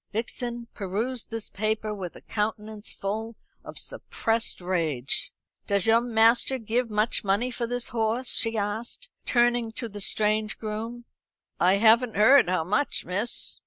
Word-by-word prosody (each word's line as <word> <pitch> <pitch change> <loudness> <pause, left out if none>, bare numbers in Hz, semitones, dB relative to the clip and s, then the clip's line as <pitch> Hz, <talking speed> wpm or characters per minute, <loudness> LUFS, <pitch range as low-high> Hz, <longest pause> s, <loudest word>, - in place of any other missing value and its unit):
Vixen 235 +2 -3
perused 220 +6 -3
this 225 -1 -4
paper 215 +1 -1
with 185 -4 -6
a - - -11
countenance 215 0 -3
full 220 +3 -4 0.3
of - - -10
suppressed 230 - -1
rage. 165 -8 -1 0.4
"Does 200 -2 +2
your 225 +1 +5
master 235 +2 +3
give 230 +1 -1
much 215 +2 +1
money 205 +6 +1
for 235 -1 -3
this 245 0 -1
horse?" 230 +2 0
she 225 -1 +1
asked, 220 - -4 0.2
turning 240 -1 +2
to 240 0 -4
the 205 -1 -7
strange 215 +1 +1
groom. 225 +2 -5 0.5
"I 180 +2 +5
haven't 225 +3 +4
heard 220 0 +6
how 185 -3 +1
much, 210 - -1
miss." 200 +7 -1
220 Hz, 145 wpm, -26 LUFS, 205-240 Hz, 0.5 s, heard